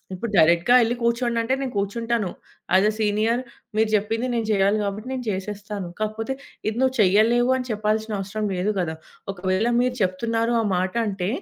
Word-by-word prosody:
ఇప్పుడు 215 +5 -4
డైరెక్ట్‌గా 170 +8 +5
యెళ్లి 240 +1 +1
కూర్చోండంటే, 235 +1 +1
నేను 265 -2 -3
కూర్చుంటాను. 225 +1 -1 0.5
యాజ్ 190 +2 +5
ఏ - - -4
సీనియర్ 215 +3 +1 0.4
మీరు 220 0 +3
జెప్పింది 225 +4 0
నేను 230 - 0
చెయ్యాలి 200 0 +3
గాబట్టి 210 +4 -4
నేను 255 -2 -4
చేసేస్తాను. 205 0 -5
కాకపోతే, 215 +3 -2 0.4
ఇది 220 - -2
నువ్వు 260 0 +2
చెయ్యలేవు 220 +5 +4
అని 255 -1 -4
చెప్పాల్సినవసరం 215 -1 -1
లేదు 195 +4 0
గదా! 170 -3 -1 0.4
ఒకవేళ 185 +5 0
మీరు 250 0 +1
చెప్తున్నారు 225 +5 0
ఆ - - 0
మాట 185 +1 -1
అంటే, 195 -3 -2
215 Hz, 160 wpm, -23 LUFS, 195-235 Hz, 0.5 s, డైరెక్ట్‌గా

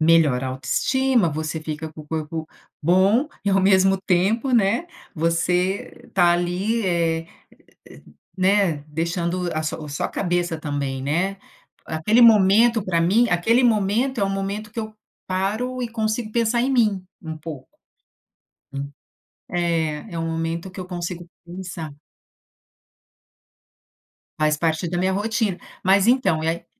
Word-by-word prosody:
melhora 155 -6 +4
a - - -2
autoestima, 235 - +1
você 155 +1 -3
fica 155 0 -5
com 155 - -10
o 150 - -19
corpo 160 0 -4 0.3
bom 195 - +3 0.2
e, 200 - +2
ao 195 0 +3
mesmo 190 0 +4
tempo, 195 +8 +1
né, 230 - +2 0.3
você 170 +1 -1
tá 175 -2 +5
ali, 180 +6 0
eh, 165 -2 0 0.6
e - - -14
e, - - -17 0.3
né, 185 -5 +2
deixando 170 +3 -2
a 155 - -2
su 155 - -3
a 150 - -8
sua 145 - -2
cabeça 175 -2 -1
também, 140 -3 -3
né. 175 +8 0 0.5
Aquele 185 +10 +2
momento, 225 +1 +6
pra 170 -3 +1
mim 220 +8 +3
aquele 220 +8 +3
momento 230 +4 +1
é - - +3
o 195 - -1
momento 200 +2 -3
que 230 - -3
eu 215 -1 -7 0.3
paro 215 +7 -2
e 240 - -2
consigo 220 0 -2
pensar 235 +1 +1
em 265 - +1
mim, 210 -7 +2 0.2
um 160 -2 -6
pouco. 155 -4 -9 1.1
Hum. 140 +1 -5 0.6
É, 170 +1 -1
é - - -3
um 165 - -2
momento 165 +3 -3
que 185 - -9
eu 180 - -6
consigo 175 -1 -5 0.2
pensar. 170 -3 -7 2.5
Faz 155 0 +2
parte 165 +2 0
da 175 +1 -2
minha 190 +1 +1
rotina. 210 -1 -1 0.3
Mas, 195 +1 +4
então, 240 -11 +3
e 160 - 0
aí 170 +1 -2
180 Hz, 150 wpm, -22 LUFS, 165-210 Hz, 2.5 s, momento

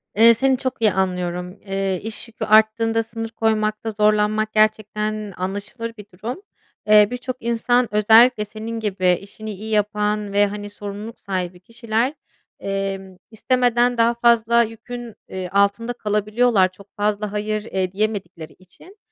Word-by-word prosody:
Eee, 230 +2 +7
seni 260 +3 +2
çok 260 -2 -4
iyi 215 -3 +4
anlıyorum. 180 -1 -2
Eee, 195 -2 -1
iş 220 +1 -7
yükü 220 -1 -6
arttığında 225 +1 +3
sınır 225 0 -6
koymakta 220 0 -1
zorlanmak 215 0 +1
gerçekten 215 -1 0
anlaşılır 205 +5 -5
bir 210 - -10
durum. 235 - -6 0.5
Eee, 210 -1 +7
birçok 250 +1 -4
insan 235 +1 +1
özellikle 220 +1 +6
senin 225 +2 -6
gibi 190 -4 +1
işini 215 +2 -9
iyi 210 +3 -8
yapan 210 0 0
ve, 205 0 +4
hani, 205 0 -6
sorumluluk 205 +2 -8
sahibi 180 -2 -4
kişiler, 230 +5 -2 0.5
emm, 195 -1 -4
istemeden 245 +1 +2
daha 230 +1 +4
fazla 235 0 +4
yükün, 230 +1 -8 0.2
ııı, 185 -1 -4
altında 200 +4 +1
kalabiliyorlar. 210 -2 +1
Çok 200 +2 -17
fazla 210 0 -1
"hayır" 210 0 -2
eee, 185 -4 -2
diyemedikleri 190 -6 -3
için. 190 - -19
215 Hz, 140 wpm, -21 LUFS, 200-230 Hz, 0.5 s, Eee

